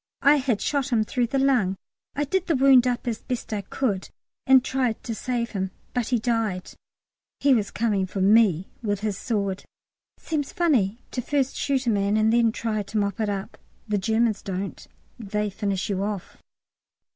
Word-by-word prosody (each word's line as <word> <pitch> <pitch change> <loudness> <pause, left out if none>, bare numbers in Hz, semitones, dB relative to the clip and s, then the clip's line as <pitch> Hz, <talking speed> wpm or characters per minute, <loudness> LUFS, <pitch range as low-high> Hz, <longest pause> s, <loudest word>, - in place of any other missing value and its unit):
"I 290 +1 +6
had 255 -6 0
shot 280 -2 0
him 225 -3 +3
through 240 +2 0
the 270 - -1
lung. 255 -9 +2 0.4
I 290 - 0
did 370 +6 -1
the 330 - +2
wound 260 -2 +6
up 245 0 -2
as 230 -2 -2
best 245 -3 -4
I 205 - -1
could 200 -1 -2 0.4
and 265 0 +6
tried 255 -4 -1
to 230 - -3
save 235 +1 -2
him, 190 -2 -2 0.2
but 245 -3 -1
he 250 - +2
died. 225 -5 -1 0.7
He 280 -1 +4
was 215 -5 +1
coming 210 -4 0
for 195 - -5
me 195 -3 +4
with 205 -3 -1
his 210 -2 -1
sword." 200 -3 -2 0.5
Seems 295 -4 -3
funny 245 - +1
to 250 - -2
first 275 +1 0
shoot 270 -2 0
a 235 - +3
man 200 0 +1
and 220 +1 +3
then 235 -1 +4
try 220 -1 -2
to 210 +2 -5
mop 200 -1 -1
it 215 -2 0
up. 195 -1 -5 0.3
The 210 -1 0
Germans 220 +1 +1
don't; 195 0 -5 0.3
they 210 -1 -2
finish 195 -1 -2
you 195 -2 -1
off. 200 -2 -4
225 Hz, 185 wpm, -25 LUFS, 200-255 Hz, 0.7 s, I